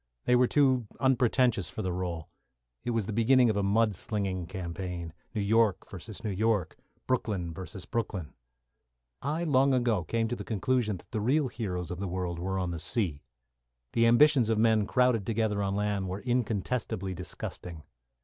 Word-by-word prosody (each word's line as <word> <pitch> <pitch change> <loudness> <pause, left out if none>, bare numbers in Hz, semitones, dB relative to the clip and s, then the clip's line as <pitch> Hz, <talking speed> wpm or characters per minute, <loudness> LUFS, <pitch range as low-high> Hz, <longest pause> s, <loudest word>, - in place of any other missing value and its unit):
They 125 - +4
were 125 0 +4
too 130 -5 +3
unpretentious 125 -6 +2
for - - -5
the 90 -1 -1
role. 85 -3 -4 0.6
It - - -3
was 115 -3 0
the 110 - -4
beginning 120 +2 +4
of - - -4
a 100 - +1
mud 105 +2 +2
slinging 95 -3 -2
campaign. 90 -2 -5 0.2
New 105 - 0
York 105 -2 +2
versus 100 +2 -9
New 110 - -1
York 100 -4 0 0.3
Brooklyn 100 -9 -1
versus 95 +1 -8
Brooklyn. 100 -8 -3 0.9
I 155 +5 -1
long 135 -3 +3
ago 120 -7 +1
came 115 +3 0
to 120 - -1
the - - -6
conclusion 115 -2 0
that - - -19
the 110 - -2
real 135 +5 +2
heroes 90 -8 -4
of 90 - -5
the 100 - -2
world 90 -1 -3
were 95 +2 -2
on 90 -2 -1
the 85 - -4
sea. 85 -8 0 0.7
The 115 0 +4
ambitions 125 0 +5
of 110 - +2
men 110 -2 +3
crowded 125 -4 +3
together 110 -1 0
on 100 0 -1
land 100 -2 -1
were 95 +2 -4
incontestably 110 -5 -1
disgusting. 85 -2 -6
105 Hz, 175 wpm, -29 LUFS, 95-120 Hz, 0.9 s, ambitions